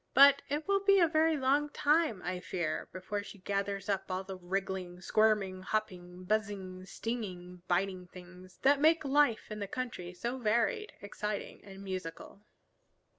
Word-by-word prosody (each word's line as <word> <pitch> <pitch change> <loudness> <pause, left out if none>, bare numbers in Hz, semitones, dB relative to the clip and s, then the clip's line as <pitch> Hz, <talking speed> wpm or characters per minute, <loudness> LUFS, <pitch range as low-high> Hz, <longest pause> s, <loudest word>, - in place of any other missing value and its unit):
But 280 0 +8
it 295 +2 -2
will 395 0 +3
be 395 -1 +6
a 340 - +6
very 315 0 +3
long 280 +2 +2
time, 295 - +2
I 180 0 -3
fear, 170 -3 -3
before 190 +3 -4
she 205 - -11
gathers 200 +1 -2
up 195 -1 -1
all 185 +1 -2
the 190 0 -7
wriggling, 185 -1 -3
squirming, 200 -1 +2
hopping, 185 -3 -3
buzzing, 190 -2 -2
stinging, 180 -6 -5
biting 185 0 0
things 180 +1 -13
that 280 +1 +5
make 320 0 +4
life 275 -6 +2
in 215 - -5
the 200 - -3
country 190 -7 -5
so 240 +7 -3
varied, 235 - +1
exciting, 210 0 -5
and 195 -1 -11
musical. 185 0 -6
200 Hz, 155 wpm, -32 LUFS, 185-260 Hz, -, But